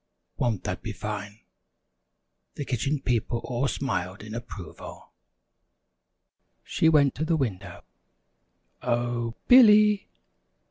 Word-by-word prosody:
Won't 115 -6 -1
that 90 - -4
be 110 -2 -5
fine?" 105 +1 -6 1.1
The 145 - -5
Kitchen 135 +3 -1
People 120 -1 -1
all 125 +2 -1
smiled 100 -7 -3
in 110 0 -9
approval. 110 -7 -9 1.5
She 160 - +2
went 145 -4 +4
to 155 - -3
the 160 0 +1
window. 115 -10 -4 1.0
"O 120 -1 -1
h, 115 - -7
Billy! 210 -4 +7
120 Hz, 105 wpm, -26 LUFS, 105-140 Hz, 1.5 s, Billy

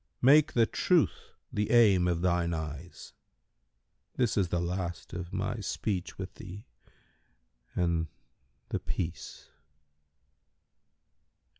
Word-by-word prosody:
Make 150 +4 +6
the 115 -2 +5
Truth 170 +7 +1 0.2
the 105 0 0
aim 100 -7 +5
of 85 -1 0
thine 85 -2 +1
eyes; 80 +2 -7 1.0
this 120 -3 +1
is 100 -3 +2
the 85 - 0
last 85 -1 -3
of 90 -1 -5
my - - -2
speech 95 -5 -3
with 95 -1 -6
thee 95 +2 -10 1.1
and—The 80 -7 -3
Peace." 85 -1 -5
90 Hz, 100 wpm, -30 LUFS, 85-105 Hz, 1.1 s, Make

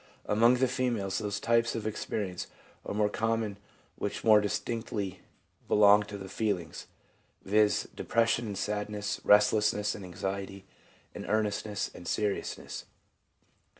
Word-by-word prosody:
Among 115 +4 +4
the 130 +1 +2
females 120 -7 -1
those 105 -2 -3
types 115 +1 +2
of 110 -2 -4
experience 105 -3 -3 0.4
are - - -3
more 105 0 +3
common 110 -1 -1 0.4
which - - -3
more 110 -2 +7
distinctly 105 -2 -3 0.5
belong 105 0 +6
to 100 - -6
the 95 -1 -8
feelings, 95 -5 -3 0.6
viz., 105 +1 +2
depression 115 0 +1
and 100 -2 -4
sadness, 105 0 -3
restlessness 105 0 +4
and 100 - -8
anxiety, 95 +2 -5 0.5
and - - -7
earnestness 105 -1 -1
and 90 - -10
serious 105 -2 -1
ness. - - -8
105 Hz, 125 wpm, -30 LUFS, 100-110 Hz, 0.6 s, more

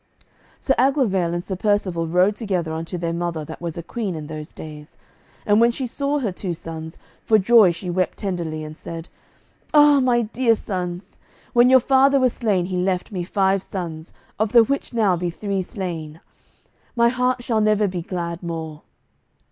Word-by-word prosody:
Sir 270 - +1
Aglovale 220 - +2
and 175 - -3
Sir 190 - -3
Percivale 185 -4 0
rode 180 +5 +3
together 185 -7 -2
unto 165 +3 -4
their 170 -1 -2
mother 170 -2 -3
that 160 +2 -9
was 170 -1 -5
a 170 - -5
queen 205 -1 -4
in 155 -1 -6
those 155 0 -7
days. 150 -1 -11 0.5
And 210 +1 +4
when 235 - +6
she 255 +2 -3
saw 280 +4 -1
her 235 -8 -1
two 180 -1 -4
sons, 160 0 -8 0.3
for 220 - +4
joy 215 -1 +6
she 175 +1 -5
wept 185 +1 -1
tenderly 170 -6 -3
and 155 0 -8
said, 165 +1 -8 0.7
"Ah 295 -1 +7
my 245 -2 +2
dear 230 +1 +2
sons, 180 -2 -5 0.3
when 240 +1 +6
your 260 0 +7
father 270 +2 +4
was 255 -2 +2
slain 200 -7 0
he 185 0 -3
left 180 +1 -1
me 180 -3 -3
five 195 +1 +1
sons, 165 -4 -6 0.3
of 215 +1 0
the 235 -1 +8
which 280 +5 -2
now 215 -6 +2
be 175 0 -2
three 195 +2 -3
slain; 170 -6 -6 0.8
my 235 0 +4
heart 250 0 0
shall 225 -3 +1
never 215 -1 +3
be 180 -2 -4
glad 170 -1 -4
more." 160 -3 -6
185 Hz, 180 wpm, -22 LUFS, 170-230 Hz, 0.8 s, the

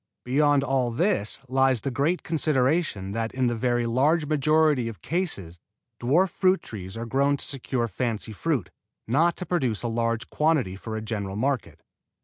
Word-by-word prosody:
Beyond 145 +2 +3
all 130 -3 +1
this 135 - 0
lies 130 -2 +2
the 135 - -2
great 150 +8 0
consideration 145 - 0
that 115 +2 -2
in 130 -1 +1
the 120 -1 +1
very 120 +1 0
large 145 +7 +2
majority 150 -3 +2
of 115 -3 -8
cases 120 - -3 0.4
dwarf 165 +10 +2
fruit 185 0 +2
trees 95 -1 -8
are 115 - -4
grown 140 +4 +2
to - - -3
secure 130 -3 -2
fancy 110 0 -3
fruit, 115 - -1 0.4
not 160 +9 +2
to 180 - -4
produce 130 - -1
a - - 0
large 115 +1 -1
quantity 150 - +1
for 110 +3 -6
a 110 - -4
general 100 -3 -4
market. 130 +2 -2
130 Hz, 165 wpm, -26 LUFS, 115-150 Hz, 0.4 s, Beyond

